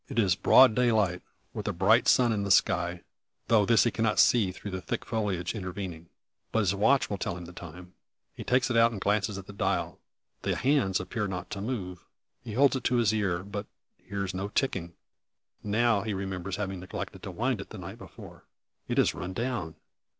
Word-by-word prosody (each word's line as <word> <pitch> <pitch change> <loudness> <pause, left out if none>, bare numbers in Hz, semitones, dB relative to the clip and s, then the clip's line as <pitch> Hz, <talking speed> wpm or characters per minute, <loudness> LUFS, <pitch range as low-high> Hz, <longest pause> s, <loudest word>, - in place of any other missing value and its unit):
It - - -6
is 100 -6 +4
broad 130 +6 +6
daylight, 110 -7 +2 0.3
with - - -5
a - - 0
bright 105 +7 +3
sun 125 -3 +5
in 105 - -1
the 100 - -3
sky; 85 -2 +2 0.5
though 105 -3 +4
this 115 -1 +5
he 120 - +1
cannot 110 -1 0
see 110 -7 +4
through 100 +2 -8
the 95 0 -4
thick - - -4
foliage 100 -6 -2
intervening. 95 -5 -6 0.4
But 110 - +2
his 100 -2 +1
watch 130 +8 +3
will 100 - -4
tell 85 - -3
him 90 - -8
the 90 - -11
time. 90 +1 -11 0.4
He - - -8
takes 125 +1 +1
it - - 0
out 115 0 +5
and 110 - -5
glances 100 0 0
at 95 - -8
the 105 - -11
dial. 100 - -1 0.4
The - - -1
hands 125 -8 +2
appear 105 +3 -3
not 90 -2 -6
to 100 - -4
move! 95 -6 -4 0.4
He 115 -3 -7
holds 140 +4 +4
it 130 - -3
to 125 - +2
his 115 -3 +3
ear, 95 -5 0
but 100 +1 -6 0.3
hears 100 -2 -4
no 95 +2 -3
ticking. 95 -7 -2 0.7
Now, 110 0 +2
he 105 -1 -3
remembers 95 -1 -4
having 95 -2 -4
neglected 90 +1 -7
to - - -7
wind - - -1
it - - -8
up - - -35
the - - -9
night - - -8
before. - - -13 0.4
It - - -2
has - - +3
run 90 +1 -6
down! 115 -8 -3
100 Hz, 210 wpm, -28 LUFS, 90-115 Hz, 0.7 s, broad